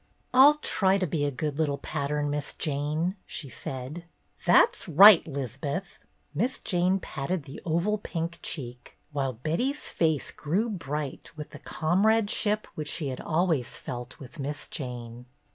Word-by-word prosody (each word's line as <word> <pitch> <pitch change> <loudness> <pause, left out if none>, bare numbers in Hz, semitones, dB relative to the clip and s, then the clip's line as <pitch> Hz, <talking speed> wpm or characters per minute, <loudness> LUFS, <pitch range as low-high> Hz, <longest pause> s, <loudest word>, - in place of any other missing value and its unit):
"I'll 275 +4 +8
try 195 -9 +2
to 190 - 0
be 155 -3 -1
a - - +1
good 145 +2 -3
little 145 -3 +1
pattern. 145 0 -2
Miss 145 0 -3
Jane," 155 +6 -1
she 140 - -4
said. 135 +7 -5 0.4
"That's - - +5
right, 185 +3 +9
'Liz'beth." 140 - -4 0.3
Miss 235 - -1
Jane 185 0 +1
patted 155 +1 -3
the 135 - -10
oval 175 +6 +1
pink 170 -3 -4
cheek, 125 -4 -7
while 135 -3 -1
Betty's 170 - -2
face 160 -4 0
grew 195 +10 -1
bright 150 -6 -4
with 150 - -7
the - - -10
comradeship 210 +4 +1
which 150 -1 -4
she 155 -5 0
had 130 - -5
always 160 -6 0
felt 120 0 -7
with 135 +1 -12
Miss 145 +1 -4
Jane. 125 -2 -7
155 Hz, 145 wpm, -27 LUFS, 140-185 Hz, 0.4 s, right